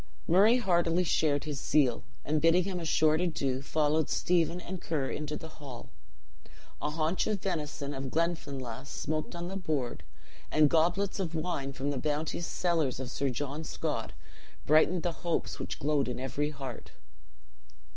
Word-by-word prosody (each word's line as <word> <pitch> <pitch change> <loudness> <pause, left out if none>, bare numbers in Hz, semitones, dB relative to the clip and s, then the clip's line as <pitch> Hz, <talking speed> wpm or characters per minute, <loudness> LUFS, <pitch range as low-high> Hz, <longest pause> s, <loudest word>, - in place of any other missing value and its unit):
Murray 205 +8 +6
heartily 175 -5 +2
shared 150 -4 +2
his 150 -3 -4
zeal, 130 -6 +3 0.2
and 150 +1 +1
bidding 165 +2 +5
him 185 -1 -3
a 170 - -5
short 155 0 +3
adieu, 140 -7 0
followed 150 +1 +1
Stephen 175 0 +2
and 180 0 -6
Ker 145 -5 -1
into 150 0 -3
the 160 - -8
hall. 130 -5 -9 0.9
A 150 - 0
haunch 160 +3 0
of 210 -2 0
venison 150 -5 -3
of 135 -1 -4
Glenfinlass 140 -6 -2
smoked 155 +2 -3
on 170 0 -4
the 190 - -5
board, 150 -10 -2 0.5
and 150 -2 +4
goblets 175 +5 +2
of 170 -4 -2
wine 155 -4 -2
from 140 +1 -2
the 140 - -2
bounteous 155 +3 -1
cellars 165 -8 0
of 130 -1 -4
Sir 140 0 0
John 145 +5 -3
Scott - - -3 0.5
brightened 155 +3 +4
the 175 - +1
hopes 170 -1 -1
which - - -4
glowed 145 -2 +1
in 125 0 -3
every 145 +3 -1
heart. 135 -5 -7
155 Hz, 160 wpm, -30 LUFS, 140-170 Hz, 0.9 s, Murray